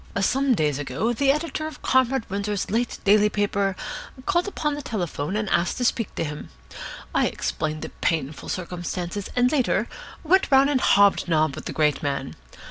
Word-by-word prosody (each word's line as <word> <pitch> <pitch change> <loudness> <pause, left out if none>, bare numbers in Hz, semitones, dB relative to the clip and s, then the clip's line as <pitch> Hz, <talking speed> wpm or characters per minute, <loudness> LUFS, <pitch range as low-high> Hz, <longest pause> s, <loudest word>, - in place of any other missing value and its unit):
Some 260 +6 +2
days 150 -5 0
ago 145 - -1
the 275 +3 +1
editor 310 +1 -2
of 310 -1 -10
Comrade 260 -2 +2
Windsor's 200 0 -2
late 235 +2 0
daily 210 +1 +5
paper 200 -2 0 0.5
called 355 0 +1
up 395 - -6
on 300 - +3
the 290 - -4
telephone 180 - -3
and 215 0 -1
asked 170 +1 +1
to 250 - 0
speak 230 -3 0
to - - -1
him. 150 -1 -6 0.6
I - - +3
explained 155 0 -3
the - - -5
painful 155 -3 -2
circumstances, 180 +1 -4
and, 250 +1 +3
later, 270 -5 +1 0.4
went 370 +4 +3
round 275 +1 +5
and 260 -3 +1
hob 200 0 +5
nobbed 155 -4 +2
with - - -8
the - - -4
great 150 -2 +1
man. 140 -2 -2
205 Hz, 180 wpm, -24 LUFS, 165-265 Hz, 0.6 s, daily